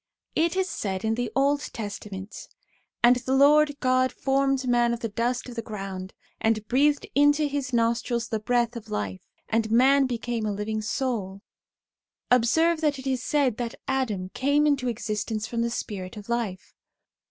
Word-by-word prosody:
It 335 +2 +2
is 380 0 +1
said 195 - -3
in 220 - +1
the 235 -1 -2
Old 280 +2 +3
Testament, 205 -2 -7 0.6
'And 245 +1 +7
the 260 +2 -1
Lord 290 +1 +5
God 255 0 +2
formed 270 -1 0
man 240 -1 +3
of 235 - -12
the 230 - -2
dust 240 +4 -1
of 245 - -8
the 230 - -2
ground, 195 -3 -7 0.2
and 215 -1 0
breathed 285 +3 +2
into 290 +2 +4
his 280 -2 -3
nostrils 235 0 0
the 220 - -1
breath 240 +1 0
of 235 - -8
life; 100 -3 -4 0.2
and 225 0 0
man 265 +4 +5
became 235 -2 -2
a - - 0
living 210 +2 -3
soul/ 210 -5 -3 0.9
1 250 - +7
Observe 320 +8 +2
that 295 -3 +1
it 265 - -9
is 260 -2 0
said 260 -3 +1
that 240 -1 -4
Adam 225 -9 -1
came 285 +7 +2
into 280 -4 +1
existence 215 -1 -2
from 230 +1 -2
the 235 - 0
Spirit 200 -3 -5
of 210 +1 -10
life. 230 -6 -3
240 Hz, 175 wpm, -26 LUFS, 215-270 Hz, 0.9 s, And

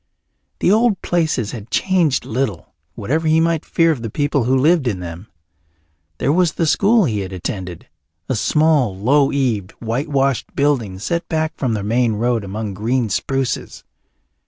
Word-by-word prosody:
The - - +3
old 220 -1 +3
places 155 -10 0
had 115 -1 -8
changed 175 -8 +1
little, 110 -7 -3 0.2
whatever 155 +10 -1
he 160 +1 +4
might 165 -1 +1
fear 165 -1 +2
of 140 -7 -3
the 115 - -4
people 145 0 0
who 130 +2 +2
lived 150 +1 +3
in 100 -6 -1
them. 85 +3 -8 0.9
There 140 - +1
was 175 -1 +2
the 165 - 0
school 205 +7 +3
he 110 -7 -1
had 95 -1 -5
attended, 90 -1 -6 0.4
a - - -1
small, 140 -4 +2
low 135 +7 +3
eaved, 120 -10 -1
white 120 +6 -3
washed 135 -3 0
building 130 -10 0
set 170 - -3
back 160 -1 -1
from 125 -5 -1
the 105 - -3
main 115 +2 +1
road 115 +1 0
among 100 +1 -5
green 115 +4 -1
spruces. 135 +6 -2
130 Hz, 165 wpm, -19 LUFS, 110-155 Hz, 0.9 s, he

